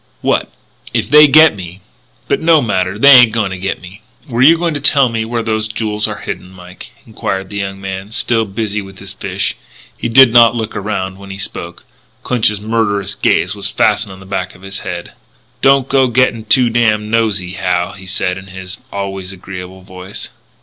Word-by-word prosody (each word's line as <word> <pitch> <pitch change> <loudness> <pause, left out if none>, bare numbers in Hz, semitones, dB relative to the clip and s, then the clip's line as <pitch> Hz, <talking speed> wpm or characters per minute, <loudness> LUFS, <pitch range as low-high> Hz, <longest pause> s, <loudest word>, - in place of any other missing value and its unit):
"What?" - - 0 0.5
"If 115 - -1
they 150 0 +8
get 155 -1 +6
me, 90 0 -9 0.5
but - - 0
no 160 -1 +5
matter; 95 -6 -1
they 140 +6 +6
ain't 125 -3 +9
a - - -13
going 110 -4 -1
to 95 - -5
get 95 +1 -3
me." 90 +4 -13 0.3
"Were 120 -2 -2
you 160 +5 +7
going 170 -1 -1
to 145 - -2
tell 140 -2 +4
me 115 -1 -2
where 115 0 -3
those 110 -1 -1
jewels 110 -1 -2
are - - -6
hidden, 90 - -6
Mike?" 90 0 -13 0.2
enquired 100 -4 -4
the 100 - -5
young 95 0 -4
man, 95 0 -6
still 115 0 0
busy 105 +1 -3
with 95 -1 -12
his - - -8
fish. - - -3 0.4
He 120 - -4
did 125 0 +6
not 120 -1 +6
look 110 -2 -4
around 95 -2 -4
when 100 0 -11
he 95 - -7
spoke. 85 -3 -6 0.4
Clinch's 110 -4 +1
murderous 100 -2 -1
gaze - - +1
was 100 -2 -1
fastened 105 0 +1
on 95 - -11
the 95 - -13
back 95 - -4
of 95 - -18
his 95 0 -6
head. 85 -1 -6 0.5
"Don't 135 -1 +4
go 135 -1 +3
to - - -6
gettin' 120 -2 +1
too 125 -3 +3
damn 110 -2 +1
nosey, 105 -6 0
Hal," 90 -1 -1
he 95 -1 -12
said 90 0 -2
in 95 - -14
his 95 +1 -8
always 95 -1 -5
agreeable 95 0 -9
voice. 95 0 -9
105 Hz, 205 wpm, -15 LUFS, 95-115 Hz, 0.5 s, ain't